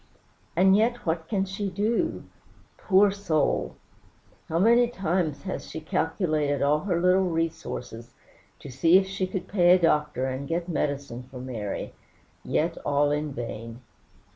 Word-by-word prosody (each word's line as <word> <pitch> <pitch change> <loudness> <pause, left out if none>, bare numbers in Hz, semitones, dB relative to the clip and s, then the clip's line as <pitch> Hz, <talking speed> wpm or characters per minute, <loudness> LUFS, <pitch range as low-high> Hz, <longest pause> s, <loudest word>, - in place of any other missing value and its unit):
And 190 +3 +5
yet 235 +3 +1
what 160 -1 -1
can 195 0 0
she 195 +1 -4
do? 220 - -1 0.5
Poor 200 0 +4
soul! 180 -7 0 0.7
how 165 - 0
many 235 +6 +5
times 180 - -2
has 190 - -5
she 160 - -6
calculated 155 -2 -1
all 145 +2 +3
her 180 -1 -1
little 180 +1 +3
resources, 140 -8 -4 0.4
to 140 - -11
see 165 +8 +5
if 190 - +2
she 190 -1 -3
could 190 0 -5
pay 180 -2 +5
a - - +2
doctor 150 -5 +1
and 130 +1 -4
get 170 +1 -2
medicine 140 -6 -2
for 130 - -10
Mary 120 -5 -5 0.5
yet 165 +2 -1
all 145 0 +2
in 150 0 -1
vain. 115 -1 -7
165 Hz, 145 wpm, -26 LUFS, 145-190 Hz, 0.7 s, And